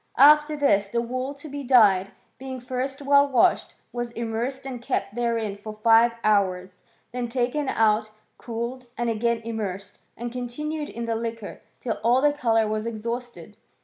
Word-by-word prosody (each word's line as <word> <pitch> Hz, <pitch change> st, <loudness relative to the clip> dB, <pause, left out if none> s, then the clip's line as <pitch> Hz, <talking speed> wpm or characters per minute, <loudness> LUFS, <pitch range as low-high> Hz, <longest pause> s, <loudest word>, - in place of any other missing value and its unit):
After 300 Hz, +2 st, +6 dB
this, 205 Hz, -9 st, +3 dB
the 235 Hz, +4 st, -1 dB
wool 255 Hz, +4 st, -3 dB
to 290 Hz, +2 st, -11 dB
be 285 Hz, -1 st, -6 dB
dyed, 210 Hz, -7 st, +5 dB, 0.3 s
being 260 Hz, -1 st, -6 dB
first 260 Hz, +3 st, -4 dB
well 280 Hz, 0 st, +5 dB
washed, 255 Hz, -4 st, +2 dB, 0.2 s
was 240 Hz, -1 st, -3 dB
immersed 235 Hz, +4 st, -3 dB
and 255 Hz, -3 st, -6 dB
kept 250 Hz, -4 st, -2 dB
therein 230 Hz, -3 st, -1 dB
for 215 Hz, +1 st, -8 dB
five 225 Hz, +2 st, +4 dB
hours; 185 Hz, -3 st, +1 dB, 0.3 s
then 245 Hz, -1 st, -3 dB
taken 255 Hz, +4 st, -1 dB
out, 215 Hz, -1 st, +2 dB, 0.3 s
cooled, 240 Hz, +2 st, -5 dB
and 240 Hz, -1 st, 0 dB
again 230 Hz, +1 st, 0 dB
im 230 Hz, 0 st, -5 dB
mersed, 195 Hz, -2 st, -5 dB, 0.2 s
and 240 Hz, +1 st, -5 dB
continued 295 Hz, +5 st, -4 dB
in 235 Hz, 0 st, -5 dB
the 230 Hz, -, -1 dB
liquor 225 Hz, -2 st, -5 dB, 0.2 s
till 230 Hz, -3 st, -3 dB
all 240 Hz, +3 st, +4 dB
the 290 Hz, +1 st, +3 dB
colour 225 Hz, -6 st, +2 dB
Was 215 Hz, +1 st, -2 dB
exhausted. 230 Hz, -3 st, -6 dB
235 Hz, 165 wpm, -25 LUFS, 220-260 Hz, 0.3 s, After